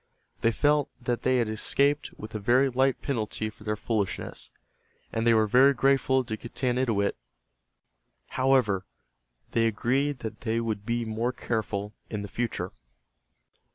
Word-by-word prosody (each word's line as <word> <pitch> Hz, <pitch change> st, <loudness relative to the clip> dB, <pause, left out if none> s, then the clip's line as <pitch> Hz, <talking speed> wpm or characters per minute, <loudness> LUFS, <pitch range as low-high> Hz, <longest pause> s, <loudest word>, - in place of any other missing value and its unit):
They 115 Hz, -, +3 dB
felt 145 Hz, +3 st, +2 dB
that 120 Hz, -1 st, -2 dB
they 130 Hz, 0 st, +2 dB
had 120 Hz, -2 st, +1 dB
escaped 140 Hz, +7 st, +1 dB
with 110 Hz, -, -9 dB
a 110 Hz, -, -3 dB
very 125 Hz, +6 st, +3 dB
light 130 Hz, +1 st, +1 dB
penalty 110 Hz, -4 st, -2 dB
for 105 Hz, -, -17 dB
their 105 Hz, 0 st, -1 dB
foolishness, 105 Hz, -2 st, -3 dB, 0.6 s
and 115 Hz, +1 st, 0 dB
they 115 Hz, -, +6 dB
were 110 Hz, 0 st, +4 dB
very 130 Hz, +6 st, +5 dB
grateful 130 Hz, 0 st, +3 dB
to 115 Hz, -3 st, -4 dB
Getanittowit. 120 Hz, -3 st, 0 dB, 1.1 s
However, 125 Hz, -8 st, +2 dB, 0.6 s
they 115 Hz, -1 st, +3 dB
agreed 130 Hz, +5 st, 0 dB
that 110 Hz, -1 st, -6 dB
they 115 Hz, -1 st, 0 dB
would 110 Hz, -3 st, -3 dB
be 120 Hz, 0 st, 0 dB
more 115 Hz, +3 st, -1 dB
careful 110 Hz, -4 st, -3 dB, 0.2 s
in 105 Hz, -2 st, -4 dB
the -, -, -5 dB
future. 100 Hz, -4 st, -3 dB
115 Hz, 145 wpm, -27 LUFS, 110-130 Hz, 1.1 s, they